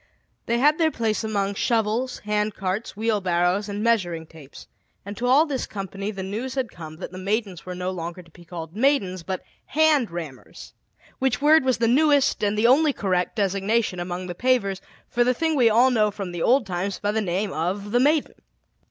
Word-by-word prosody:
They 235 Hz, -, +1 dB
had 295 Hz, +5 st, +3 dB
their 320 Hz, -1 st, +4 dB
place 225 Hz, -7 st, -1 dB
among 200 Hz, -2 st, -1 dB
shovels, 230 Hz, +4 st, 0 dB
hand 210 Hz, 0 st, 0 dB
carts, 195 Hz, +3 st, -3 dB
wheelbarrows, 195 Hz, -2 st, +1 dB
and 205 Hz, +1 st, -3 dB
measuring 175 Hz, -8 st, +1 dB
tapes; 155 Hz, -4 st, -14 dB, 0.4 s
and 200 Hz, +1 st, -6 dB
to 245 Hz, -, -2 dB
all 275 Hz, +5 st, +5 dB
this 280 Hz, -5 st, -3 dB
company 195 Hz, 0 st, -5 dB
the 195 Hz, -3 st, -5 dB
news 225 Hz, +8 st, -4 dB
had 255 Hz, -5 st, -2 dB
come 155 Hz, -2 st, -9 dB
that 175 Hz, -, -8 dB
the 185 Hz, -, -8 dB
Maidens 195 Hz, -2 st, -3 dB
were 180 Hz, -, -5 dB
no 180 Hz, +1 st, -3 dB
longer 175 Hz, 0 st, -6 dB
to 170 Hz, -, -22 dB
be 175 Hz, -, -16 dB
called 170 Hz, 0 st, -8 dB
"maidens," 215 Hz, -8 st, +1 dB
but 185 Hz, +2 st, -5 dB, 0.2 s
"hand 305 Hz, -6 st, +3 dB
rammers," 160 Hz, -7 st, -9 dB, 0.5 s
which 260 Hz, -2 st, +1 dB
word 300 Hz, +1 st, +5 dB
was 260 Hz, -1 st, +1 dB
the 230 Hz, -, +1 dB
newest 285 Hz, 0 st, +3 dB
and 205 Hz, 0 st, +1 dB
the 215 Hz, -, +2 dB
only 285 Hz, +4 st, +5 dB
correct 185 Hz, -5 st, -1 dB
designation 200 Hz, 0 st, 0 dB
among 175 Hz, +1 st, -4 dB
the 180 Hz, -, -5 dB
pavers 200 Hz, -3 st, 0 dB, 0.3 s
for 240 Hz, -, +1 dB
the 250 Hz, +1 st, +1 dB
thing 320 Hz, +3 st, 0 dB
we 245 Hz, -5 st, +5 dB
all 240 Hz, +4 st, +4 dB
know 215 Hz, -3 st, +3 dB
from 195 Hz, -3 st, -6 dB
the 175 Hz, -1 st, -5 dB
old 255 Hz, +4 st, +3 dB
times 190 Hz, +1 st, -3 dB
by 205 Hz, -, -1 dB
the 220 Hz, +1 st, 0 dB
name 195 Hz, +1 st, -2 dB
of 190 Hz, +6 st, -3 dB
"the 245 Hz, -, +3 dB
maiden." 295 Hz, +3 st, +2 dB
210 Hz, 200 wpm, -24 LUFS, 185-245 Hz, 0.5 s, all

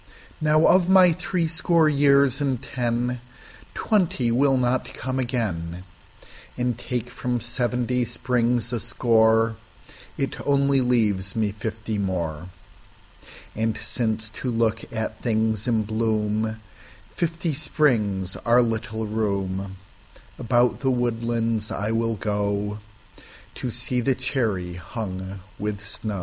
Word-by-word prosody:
Now, 155 Hz, +1 st, +4 dB
of 185 Hz, -1 st, +5 dB
my 185 Hz, -2 st, +7 dB
threescore 165 Hz, -1 st, +1 dB
years 140 Hz, -2 st, +4 dB
and 135 Hz, -4 st, 0 dB
ten, 120 Hz, 0 st, -2 dB, 0.5 s
Twenty 170 Hz, -, +1 dB
will 135 Hz, +2 st, +3 dB
not 125 Hz, 0 st, 0 dB
come 130 Hz, +2 st, -3 dB
again, 95 Hz, -9 st, -2 dB, 0.7 s
And 125 Hz, -1 st, 0 dB
take 120 Hz, 0 st, -3 dB
from 125 Hz, -1 st, -2 dB
seventy 125 Hz, +1 st, -1 dB
springs 120 Hz, -1 st, 0 dB
a 120 Hz, -, 0 dB
score, 115 Hz, +1 st, +3 dB, 0.6 s
It 135 Hz, -, -2 dB
only 140 Hz, -1 st, +3 dB
leaves 105 Hz, -6 st, +1 dB
me 110 Hz, -2 st, +1 dB
fifty 110 Hz, 0 st, -4 dB
more. 85 Hz, -4 st, -2 dB, 1.1 s
And 110 Hz, 0 st, 0 dB
since 110 Hz, -2 st, -2 dB
to 130 Hz, -, -1 dB
look 115 Hz, -1 st, 0 dB
at 110 Hz, -1 st, -4 dB
things 110 Hz, -1 st, 0 dB
in 110 Hz, -3 st, +2 dB
bloomFifty 110 Hz, -, -2 dB
springs 110 Hz, -11 st, +1 dB
are 120 Hz, +1 st, +4 dB
little 110 Hz, -1 st, -2 dB
room, 100 Hz, -3 st, -2 dB, 0.6 s
About 120 Hz, 0 st, +2 dB
the 135 Hz, -, +1 dB
woodlands 115 Hz, -3 st, 0 dB
I 105 Hz, +2 st, -2 dB
will 115 Hz, 0 st, 0 dB
goTo 105 Hz, +4 st, -5 dB
see 125 Hz, +2 st, -1 dB
the 130 Hz, +2 st, +2 dB
cherry 110 Hz, -9 st, -1 dB
hung 95 Hz, 0 st, -6 dB, 0.2 s
with 105 Hz, 0 st, -3 dB
snow. 105 Hz, -1 st, -4 dB
115 Hz, 110 wpm, -24 LUFS, 105-125 Hz, 1.1 s, my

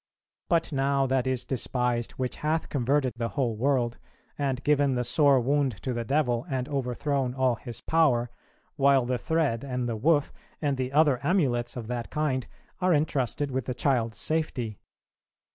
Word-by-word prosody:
But 165 Hz, -1 st, +2 dB
now 135 Hz, -1 st, +1 dB
that 130 Hz, -1 st, +1 dB
is 130 Hz, -2 st, -1 dB
despised 125 Hz, -2 st, -1 dB
which 130 Hz, -1 st, -3 dB
hath 155 Hz, +2 st, -1 dB
converted 135 Hz, -1 st, +1 dB
the 115 Hz, -1 st, -2 dB
whole 120 Hz, -5 st, +1 dB
world, 120 Hz, 0 st, 0 dB, 0.4 s
and 135 Hz, -2 st, -2 dB
given 145 Hz, -2 st, +3 dB
the 125 Hz, -, 0 dB
sore 140 Hz, +2 st, +4 dB
wound 135 Hz, +1 st, +1 dB
to 130 Hz, -, -1 dB
the 120 Hz, 0 st, -2 dB
devil, 125 Hz, -2 st, +1 dB
and 130 Hz, -2 st, -2 dB
overthrown 135 Hz, -1 st, -1 dB
all 130 Hz, -2 st, +2 dB
his 115 Hz, 0 st, -8 dB
power; 130 Hz, -8 st, +2 dB, 0.5 s
while 135 Hz, -2 st, +4 dB
the 125 Hz, 0 st, -1 dB
thread, 155 Hz, -8 st, 0 dB
and 125 Hz, -3 st, -2 dB
the 115 Hz, -, -2 dB
woof, 145 Hz, +6 st, +2 dB, 0.3 s
and 145 Hz, -3 st, 0 dB
the 130 Hz, 0 st, -3 dB
other 145 Hz, -3 st, +4 dB
amulets 125 Hz, -11 st, +1 dB
of 120 Hz, -, -5 dB
that 120 Hz, 0 st, -4 dB
kind, 145 Hz, -5 st, -1 dB, 0.3 s
are 180 Hz, -2 st, +3 dB
entrusted 145 Hz, -2 st, 0 dB
with 130 Hz, -2 st, -2 dB
the 125 Hz, -, -3 dB
child's 120 Hz, -4 st, 0 dB
safety." 130 Hz, -9 st, -2 dB
130 Hz, 165 wpm, -27 LUFS, 120-145 Hz, 0.5 s, sore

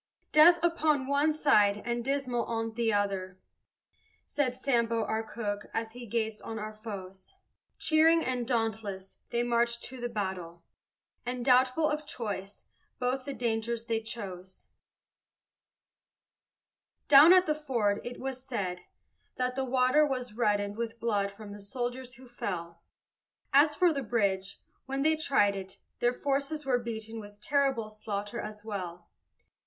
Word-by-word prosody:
"Death 330 Hz, +3 st, +8 dB
upon 310 Hz, -5 st, +2 dB
one 285 Hz, +3 st, +2 dB
side, 210 Hz, -10 st, +4 dB
and 235 Hz, 0 st, -1 dB
Dismal 265 Hz, -2 st, 0 dB
on 225 Hz, -1 st, -2 dB
t' 230 Hz, 0 st, +1 dB
other," 195 Hz, -3 st, -1 dB, 0.9 s
Said 260 Hz, -4 st, -1 dB
Sambo, 235 Hz, -4 st, +1 dB
our 220 Hz, 0 st, -1 dB
cook, 210 Hz, -2 st, -4 dB
as 225 Hz, 0 st, -2 dB
he 240 Hz, 0 st, -9 dB
gazed 220 Hz, -1 st, -2 dB
on 225 Hz, -, -6 dB
our 215 Hz, 0 st, -5 dB
foes: 200 Hz, -, -9 dB, 0.4 s
Cheering 325 Hz, +1 st, +4 dB
and 250 Hz, -2 st, -1 dB
dauntless 220 Hz, -5 st, -2 dB
they 235 Hz, 0 st, 0 dB
marched 235 Hz, 0 st, +1 dB
to 255 Hz, -1 st, -6 dB
the 240 Hz, -, -2 dB
battle, 190 Hz, -6 st, -4 dB, 0.6 s
And, 245 Hz, 0 st, -4 dB
doubtful 255 Hz, +4 st, +4 dB
of 300 Hz, 0 st, -2 dB
choice, 205 Hz, -6 st, -5 dB, 0.3 s
both 255 Hz, +1 st, -1 dB
the 280 Hz, -, -4 dB
dangers 230 Hz, -1 st, -1 dB
they 225 Hz, -1 st, 0 dB
chose. 190 Hz, -5 st, -8 dB, 2.4 s
Down 295 Hz, +4 st, +9 dB
at 370 Hz, 0 st, +7 dB
the 305 Hz, -, +2 dB
ford, 240 Hz, -9 st, 0 dB
it 245 Hz, 0 st, -7 dB
was 260 Hz, -1 st, -5 dB
said, 190 Hz, -9 st, -3 dB, 0.5 s
that 250 Hz, 0 st, -1 dB
the 265 Hz, +1 st, -1 dB
water 255 Hz, +3 st, +4 dB
Was 255 Hz, -5 st, -2 dB
reddened 205 Hz, -2 st, 0 dB
with 230 Hz, 0 st, -4 dB
blood 205 Hz, -3 st, 0 dB
from 205 Hz, 0 st, -11 dB
the 205 Hz, -, -10 dB
soldiers 245 Hz, +3 st, -4 dB
who 260 Hz, 0 st, -14 dB
fell: 175 Hz, -8 st, -5 dB, 0.7 s
As 295 Hz, +2 st, +6 dB
for 350 Hz, 0 st, +4 dB
the 280 Hz, -, -2 dB
bridge, 200 Hz, -5 st, -1 dB, 0.2 s
when 270 Hz, +1 st, -1 dB
they 315 Hz, +1 st, +4 dB
tried 210 Hz, -10 st, +2 dB
it, 190 Hz, -1 st, -7 dB, 0.2 s
their 240 Hz, -, +3 dB
forces 280 Hz, +3 st, -2 dB
Were 250 Hz, -2 st, +2 dB
beaten 225 Hz, -1 st, -5 dB
with 205 Hz, -1 st, -11 dB
terrible 265 Hz, -3 st, +1 dB
slaughter 205 Hz, -1 st, -4 dB
as 210 Hz, 0 st, -8 dB
well. 180 Hz, -5 st, -5 dB
235 Hz, 145 wpm, -30 LUFS, 205-265 Hz, 2.4 s, Down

